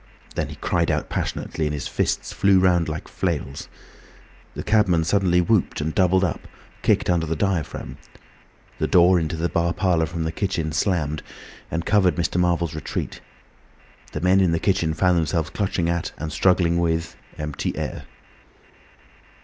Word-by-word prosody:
Then - - -2
he - - -8
cried - - 0
out - - -1
passionately 80 - -3
and 75 - -2
his 70 - -4
fists - - -1
flew 100 -1 +4
round 90 -3 +3
like 75 0 -5
flails. 70 +1 -3 0.9
The - - -4
cabman 95 -6 +3
suddenly 90 0 +2
whooped 100 +3 +1
and 80 +1 -2
doubled 95 0 +3
up, 90 - -2 0.3
kicked - - +2
under 85 -2 +1
the 80 - -1
diaphragm. 90 -1 -2 0.8
The - - +1
door 90 +1 +5
into 80 0 -2
the 80 +2 0
bar 85 +1 0
parlour 85 -5 +1
from 80 +1 -4
the 80 - -2
kitchen 80 -3 -2
slammed 80 -3 0 0.5
and 85 +1 -3
covered 100 -3 +3
Mr. 85 0 0
Marvel's 85 -2 +1
retreat. 75 -2 -5 0.9
The 75 - -4
men 95 +2 +4
in 90 -3 +3
the 85 - +1
kitchen 85 -5 +1
found 90 +1 +3
themselves 80 0 -1
clutching 95 -3 -1
at 85 0 -2
and 75 0 -5
struggling 85 -2 +3
with 85 0 -1 0.2
empty 75 -1 -3
air. - - -4
85 Hz, 160 wpm, -23 LUFS, 80-90 Hz, 0.9 s, door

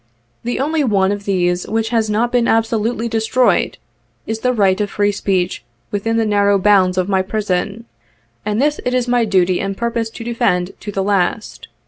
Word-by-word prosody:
The 240 - -2
only 300 +3 0
one 200 -6 +2
of 205 0 -4
these 180 -2 0
which 225 0 -1
has 225 -2 0
not 225 +3 +1
been 245 -1 +2
absolutely 225 +1 0
destroyed, 225 -2 +1 0.5
is 220 0 -3
the 250 +2 +1
right 200 -4 +2
of 205 - -1
free 205 0 +1
speech 185 - -1 0.3
within 225 +3 -1
the 225 - +2
narrow 205 -1 +3
bounds 185 -2 +3
of 185 0 +1
my 190 -1 +2
prison, 205 +2 -2 0.6
and 210 +1 -1
this 295 +2 +1
it 250 0 -1
is 250 -1 0
my 240 -1 +2
duty 185 -3 +2
and 195 0 -3
purpose 235 -1 -2
to 230 - -9
defend 190 -6 0
to 205 - -6
the 195 -1 -1
last. 200 +2 -1
210 Hz, 185 wpm, -18 LUFS, 195-230 Hz, 0.6 s, narrow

